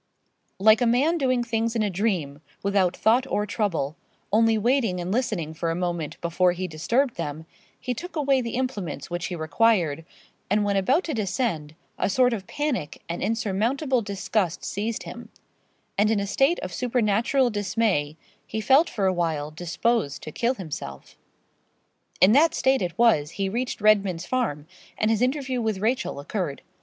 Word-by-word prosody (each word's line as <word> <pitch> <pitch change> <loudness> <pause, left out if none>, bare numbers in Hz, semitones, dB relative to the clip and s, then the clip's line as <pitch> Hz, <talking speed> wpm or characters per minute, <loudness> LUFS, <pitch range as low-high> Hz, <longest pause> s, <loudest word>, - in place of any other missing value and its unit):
Like 215 +3 +5
a 245 - +3
man 285 +9 +2
doing 255 -3 +1
things 230 0 -1
in 225 - +1
a 210 - 0
dream, 175 -8 -1 0.2
without 195 -3 +1
thought 245 +4 +3
or 210 - 0
trouble, 195 - -1 0.4
only 225 0 +4
waiting 225 -4 +1
and 175 +1 -3
listening 205 -9 -1
for 165 +1 -2
a 165 - -1
moment 170 -3 -3
before 175 +1 +2
he 185 +1 -3
disturbed 235 - 0
them, 160 -1 -4 0.3
he 250 - -2
took 350 +8 -8
away 275 -3 +2
the 235 -1 -4
implements 200 - -3
which 175 0 -2
he 180 - -4
required; 165 -1 +1 0.5
and 210 +2 +2
when 200 -1 0
about 260 - +2
to 315 - -3
descend, 195 - -2 0.2
a - - +1
sort 250 +4 +3
of 195 -4 -5
panic 290 - -3
and 170 - -4
insurmountable 230 +6 0
disgust 195 -3 -2
seized 215 +3 -3
him; - - -9 0.7
and 210 +1 +4
in 220 -2 +2
a 200 - -1
state 270 - +2
of 185 - -5
supernatural 240 +2 +1
dismay, 200 -7 0 0.3
he 220 - -3
felt 270 +9 +4
for 200 -4 -1
a 190 - +3
while 160 -4 -1
disposed 170 0 -1
to 155 - -6
kill 240 - 0
himself. 145 - -7 1.0
In 185 - +6
that 305 +7 +5
state 265 0 +2
it 175 -2 -3
was 220 -12 +4
he 195 -1 0
reached 245 +5 -3
Redman's 200 -5 +3
Farm, 190 - -1 0.3
and 215 +1 +2
his 220 0 +1
interview 260 -1 0
with 220 -3 -1
Rachel 220 - -1
occurred. 150 -1 -4
210 Hz, 170 wpm, -25 LUFS, 175-245 Hz, 1.0 s, In